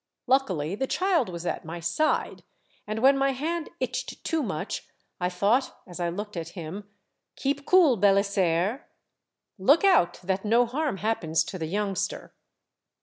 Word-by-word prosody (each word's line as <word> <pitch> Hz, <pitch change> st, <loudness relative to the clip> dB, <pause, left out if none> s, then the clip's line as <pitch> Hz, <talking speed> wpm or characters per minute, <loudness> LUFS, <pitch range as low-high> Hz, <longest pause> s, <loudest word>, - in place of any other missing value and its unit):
Luckily 195 Hz, -, +1 dB
the 265 Hz, +6 st, -2 dB
child 360 Hz, -, +1 dB
was 170 Hz, -1 st, -6 dB
at -, -, -2 dB
my 165 Hz, +2 st, -6 dB
side, 175 Hz, -, 0 dB, 0.5 s
and 215 Hz, +2 st, -3 dB
when 275 Hz, +1 st, +6 dB
my 275 Hz, 0 st, +2 dB
hand 320 Hz, +5 st, -3 dB
itched 255 Hz, 0 st, -4 dB
too 325 Hz, -1 st, 0 dB
much 190 Hz, -, -4 dB, 0.3 s
I 180 Hz, 0 st, 0 dB
thought 205 Hz, +9 st, +1 dB
as 180 Hz, -1 st, -10 dB
I 175 Hz, -1 st, 0 dB
looked 205 Hz, +4 st, -6 dB
at 165 Hz, -1 st, -4 dB
him: 185 Hz, +5 st, -7 dB, 0.2 s
' -, -, -56 dB
Keep 280 Hz, +1 st, -2 dB
cool, 340 Hz, -10 st, +5 dB
Belisaire. 200 Hz, -, +2 dB, 0.7 s
Look 280 Hz, -, +4 dB
out 370 Hz, -, +4 dB
that 190 Hz, +1 st, -1 dB
no 230 Hz, +3 st, +4 dB
harm 275 Hz, -1 st, -2 dB
happens 170 Hz, -7 st, 0 dB
to 185 Hz, -, -7 dB
the 160 Hz, -, -3 dB
youngster 205 Hz, +2 st, -3 dB
210 Hz, 155 wpm, -26 LUFS, 180-270 Hz, 0.7 s, when